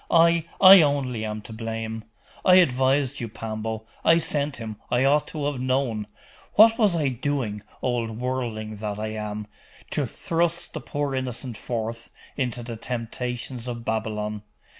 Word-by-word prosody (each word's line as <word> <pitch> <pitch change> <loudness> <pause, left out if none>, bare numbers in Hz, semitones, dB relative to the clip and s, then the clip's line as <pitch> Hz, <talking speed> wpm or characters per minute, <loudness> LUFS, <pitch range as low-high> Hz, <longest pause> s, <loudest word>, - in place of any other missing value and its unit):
I, 170 -1 +5
I 190 -1 +10
only 135 -6 0
am 105 0 -4
to 110 - -9
blame. 110 0 -4 0.4
I 180 - +7
advised 135 -4 +3
you, 115 -3 -4
Pambo! 110 0 -5 0.2
I 165 - +6
sent 145 -3 0
him 110 -2 -6
I 125 +2 +2
ought 145 +2 +3
to 150 -3 -4
have 145 -3 -2
known 130 -5 0 0.5
what 225 +2 +7
was 205 -6 +4
I 150 -4 +1
doing, 125 -5 -2 0.2
old 115 -3 -1
worldling 115 -4 -3
that 105 -1 -4
I 110 0 -3
am, 105 -1 -4 0.5
to - - 0
thrust 170 +1 -1
the - - -5
poor 145 -2 -2
innocent 125 -2 -3
forth 115 0 -4 0.3
into 125 -3 -2
the 115 -1 -6
temptations 125 +1 -4
of 120 -1 -5
Babylon? 105 -1 -2
125 Hz, 155 wpm, -25 LUFS, 110-145 Hz, 0.5 s, I